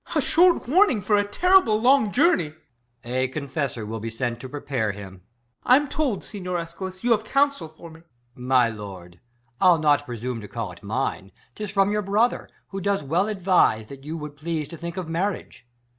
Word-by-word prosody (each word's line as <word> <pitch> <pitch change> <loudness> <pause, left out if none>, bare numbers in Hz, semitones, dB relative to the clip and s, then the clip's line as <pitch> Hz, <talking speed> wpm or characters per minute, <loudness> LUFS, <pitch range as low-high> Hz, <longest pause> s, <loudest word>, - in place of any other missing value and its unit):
Ben. - - -8
a - - +3
short 350 -3 +4
warning 335 - +4
for 205 +2 +1
a 205 - +3
terrible 230 - +3
long 245 -2 +4
journey. 255 - +2 0.5
EsCH. - - -23
A 130 +2 0
confessor 135 -4 -4
Avill 110 +1 -5
be 115 - -4
sent 120 +1 -3
to 130 - -8
prepare 130 -7 -2
him. 100 -2 -10 0.5
Ben. 255 +3 +5
I'm - - -6
told, 275 -8 -1
Siguier 180 -4 -4
Eschalus, 185 +3 -6
you 240 - +1
have 220 -2 +3
coun 280 +5 +3
sel 280 -12 -7
for 160 +1 -13
me. 160 - -14
EsCH. 165 - -24 0.3
My 125 -1 +3
lord, 95 -5 -9 0.4
I'll 180 -2 +6
not 145 -2 +2
presume 120 0 -4
to 105 - -9
call 110 -2 -5
it 85 - -14
mine; 100 -3 -3 0.2
'Tis 210 - -6
from 195 0 +2
your 210 0 0
brother, 210 +5 0 0.2
who 195 0 -5
does 200 -3 0
well 170 +8 +1
advise, 185 - +2
That 135 +4 -12
you 155 +3 -5
would 150 -2 -8
please 155 -1 -3
to - - -8
think 170 +2 -7
of 185 -3 -4
marriage. 170 -5 -3
165 Hz, 205 wpm, -24 LUFS, 125-205 Hz, 0.5 s, I'll